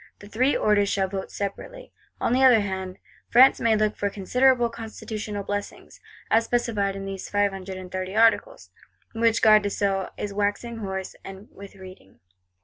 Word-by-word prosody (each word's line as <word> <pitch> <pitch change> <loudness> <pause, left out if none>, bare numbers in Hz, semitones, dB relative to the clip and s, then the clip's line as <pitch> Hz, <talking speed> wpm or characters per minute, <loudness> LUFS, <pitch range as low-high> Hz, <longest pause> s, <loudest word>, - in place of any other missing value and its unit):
The 205 - -14
Three 255 +7 +1
Orders 205 -1 +2
shall 195 -1 0
vote 190 0 -5
separately. - - -7 0.3
On - - 0
the 260 +1 +3
other 245 -4 +6
hand, 190 -2 -5 0.3
France 255 +3 +6
may 225 -1 +2
look 215 0 0
for 200 - -2
considerable 245 +5 +2
constitutional 220 -2 -6
blessings; 205 0 -6 0.3
as 225 +1 +4
specified 225 -5 -1
in 195 0 -6
these 195 -1 -6
Five 205 -1 +1
and 190 -1 -8 0.2
thirty 185 +1 -4
Articles, 225 0 +2 0.4
which 225 0 +1
Garde 215 -1 +7
des 205 - -2
Sceaux 195 -2 -1
is 205 -1 -5
waxing 205 +3 -2
hoarse 190 -3 -5 0.4
with 200 0 -12
reading. 185 - -14
205 Hz, 160 wpm, -24 LUFS, 195-230 Hz, 0.4 s, Garde